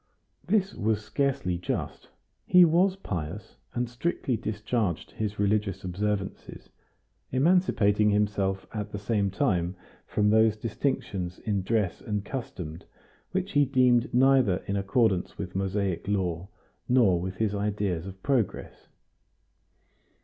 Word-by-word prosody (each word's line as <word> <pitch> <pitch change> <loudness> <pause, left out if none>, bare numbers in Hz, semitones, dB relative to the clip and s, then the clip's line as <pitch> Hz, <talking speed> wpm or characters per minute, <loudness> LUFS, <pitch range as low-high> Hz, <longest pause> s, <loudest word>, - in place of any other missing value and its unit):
This 205 -2 +1
was 105 -1 -1
scarcely 130 -6 -1
just; 90 - -4 0.4
he 180 -1 +8
was 180 +4 +3
pious, 95 - -6 0.2
and 120 0 0
strictly 125 +1 -1
discharged 110 -4 -2
his 105 -1 -3
religious 100 -1 0
observances, 100 +2 -4 0.6
emancipating 125 - +3
himself 100 -2 0
at 105 -1 -4
the - - -4
same 100 -1 0
time 95 -5 0 0.3
from 105 0 +2
those 110 0 +4
distinctions 105 -6 -2
in 105 -3 -1
dress 100 -3 0
and 105 -2 -3
customs 90 - -6 0.5
which 190 +1 -2
he 145 -1 +4
deemed 125 -3 +3
neither 125 -7 +4
in 100 - -2
accordance 100 -1 +1
with 90 -2 -5
Mosaic 95 -2 -1
law 90 -3 -1 0.4
nor 110 -9 +4
with 95 +1 -4
his 105 0 0
ideas 100 -4 -1
of 95 0 -10
progress. 130 -8 -1
105 Hz, 120 wpm, -27 LUFS, 95-125 Hz, 0.6 s, he